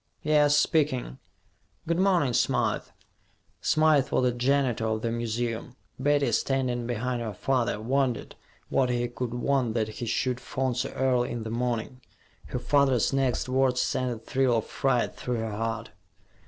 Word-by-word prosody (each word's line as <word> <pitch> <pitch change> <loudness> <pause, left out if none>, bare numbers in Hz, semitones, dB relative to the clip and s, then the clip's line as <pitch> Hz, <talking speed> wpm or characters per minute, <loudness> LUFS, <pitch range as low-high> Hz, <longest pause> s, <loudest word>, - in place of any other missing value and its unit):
Yes, 150 -1 +4
speaking. 145 -4 +1 0.7
Good 170 +2 0
morning, 180 -9 +3
Smythe." - - +1 0.8
Smythe 155 -3 +3
was - - +1
the 125 - +3
janitor 125 -2 +1
of 110 0 -2
the 115 - 0
museum. 120 +1 -3 0.2
Betty, 140 -1 +2
standing 125 -3 0
behind 120 +1 -2
her 110 -4 -4
father, 125 -1 0
wondered 130 +1 -1 0.4
what 130 -2 +2
he 120 0 0
could 120 0 -4
want 125 -2 0
that 110 -2 0
he 115 +2 -6
should 125 +2 0
phone 130 0 -2
so 125 - -2
early 125 -2 +1
in 120 -2 -4
the 110 - -5
morning. 120 +1 -2 0.5
Her - - -4
father's 135 -2 +2
next 135 -3 +1
words 130 -1 +2
sent 125 0 0
a 120 - -4
thrill 125 +1 +1
of 110 - -2
fright 125 -3 0
through 125 - -3
her 110 -1 -3
heart. 115 +1 -3
125 Hz, 155 wpm, -27 LUFS, 115-135 Hz, 0.8 s, Yes